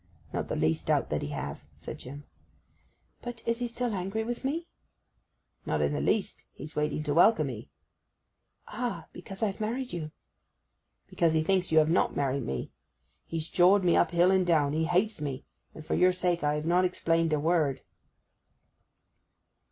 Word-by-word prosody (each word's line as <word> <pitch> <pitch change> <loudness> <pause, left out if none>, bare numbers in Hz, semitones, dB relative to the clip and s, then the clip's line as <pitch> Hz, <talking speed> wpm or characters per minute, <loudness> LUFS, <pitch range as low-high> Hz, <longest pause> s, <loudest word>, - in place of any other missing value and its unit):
'Not - - -2
the - - -3
least 80 0 0
doubt - - +1
that - - 0
he - - -3
have,' 70 0 -5 0.2
said - - -8
Jim. 145 +3 -9 1.0
'But 240 -2 -7
is 230 +1 0
he 245 - -1
still 235 0 -2
angry 195 +3 -2
with 240 +3 -4
me?' 325 +6 -2 1.0
'Not - - -1
in - - +1
the - - -1
least. 210 - -1
He's 155 - -9
waiting 150 0 -1
to 145 -1 -1
welcome 165 -5 +4
'ee.' 110 -2 -9 1.0
'Ah! 240 +2 -4
because 195 0 -7
I've 205 0 -1
married 245 +4 -3
you.' 155 -3 -4 1.0
'Because 165 -2 +1
he 155 - +2
thinks 185 +1 +1
you 160 - +3
have 155 0 +5
not 180 - +2
married 140 -2 -1
me! 65 -2 -4 0.6
He's 165 -1 -3
jawed 185 +4 +4
me 175 -2 +4
up 175 - +4
hill 175 +2 +4
and 190 -1 +3
down. 155 -5 +2
He 160 +1 +1
hates 180 +2 +1
me; 140 -3 -4 0.3
and 155 - -10
for - - -2
your 185 0 +4
sake 180 -2 0
I 150 0 +2
have 150 +1 -3
not 175 +2 +3
explained 165 -2 +1
a 150 - +2
word. 155 -3 +1
170 Hz, 175 wpm, -29 LUFS, 150-200 Hz, 1.0 s, have